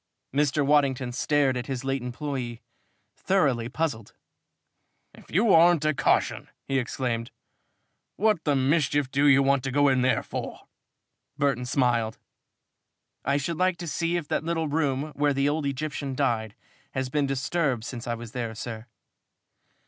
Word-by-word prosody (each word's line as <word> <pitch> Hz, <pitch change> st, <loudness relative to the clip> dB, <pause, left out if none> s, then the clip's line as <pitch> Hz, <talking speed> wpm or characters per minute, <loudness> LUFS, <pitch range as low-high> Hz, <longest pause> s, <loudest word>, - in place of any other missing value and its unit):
Mr. 145 Hz, 0 st, +2 dB
Waddington 135 Hz, -3 st, +2 dB
stared 140 Hz, +1 st, +1 dB
at 125 Hz, -1 st, -4 dB
his 130 Hz, -2 st, -4 dB
late 135 Hz, -1 st, -1 dB
employee, 125 Hz, -2 st, -5 dB, 0.5 s
thoroughly 135 Hz, -12 st, +1 dB
puzzled. 130 Hz, -7 st, -3 dB, 1.0 s
"If -, -, -17 dB
you 200 Hz, +4 st, +3 dB
aren't 165 Hz, -1 st, +5 dB
a 155 Hz, -, +3 dB
caution!" -, -, +1 dB, 0.2 s
he 135 Hz, -1 st, +1 dB
exclaimed. 120 Hz, -2 st, -2 dB, 0.9 s
"What 210 Hz, -5 st, +2 dB
the 145 Hz, -2 st, +2 dB
mischief 140 Hz, 0 st, +1 dB
do 140 Hz, +1 st, +3 dB
you 140 Hz, -1 st, +6 dB
want 135 Hz, -1 st, +2 dB
to 130 Hz, -, -2 dB
go 145 Hz, +1 st, +4 dB
in 130 Hz, -1 st, +2 dB
there 130 Hz, +1 st, +2 dB
for?" -, -, -6 dB, 0.8 s
Burton 135 Hz, -4 st, 0 dB
smiled. 120 Hz, -4 st, +1 dB, 1.1 s
"I 140 Hz, +1 st, +1 dB
should 155 Hz, +3 st, -2 dB
like 185 Hz, 0 st, +2 dB
to 170 Hz, 0 st, -6 dB
see 165 Hz, +3 st, 0 dB
if 165 Hz, -4 st, -5 dB
that -, -, 0 dB
little 165 Hz, -1 st, -1 dB
room 145 Hz, -1 st, -1 dB
where 145 Hz, -1 st, +1 dB
the 140 Hz, +1 st, +2 dB
old 145 Hz, 0 st, 0 dB
Egyptian 140 Hz, -1 st, -3 dB
died 115 Hz, -6 st, -1 dB, 0.4 s
has 130 Hz, -1 st, -2 dB
been 145 Hz, +1 st, 0 dB
disturbed 135 Hz, -2 st, -1 dB
since 120 Hz, -1 st, -7 dB
I 120 Hz, -, -1 dB
was 115 Hz, -1 st, -9 dB
there, 115 Hz, -3 st, -4 dB
sir." 115 Hz, 0 st, -7 dB
140 Hz, 155 wpm, -26 LUFS, 125-150 Hz, 1.1 s, you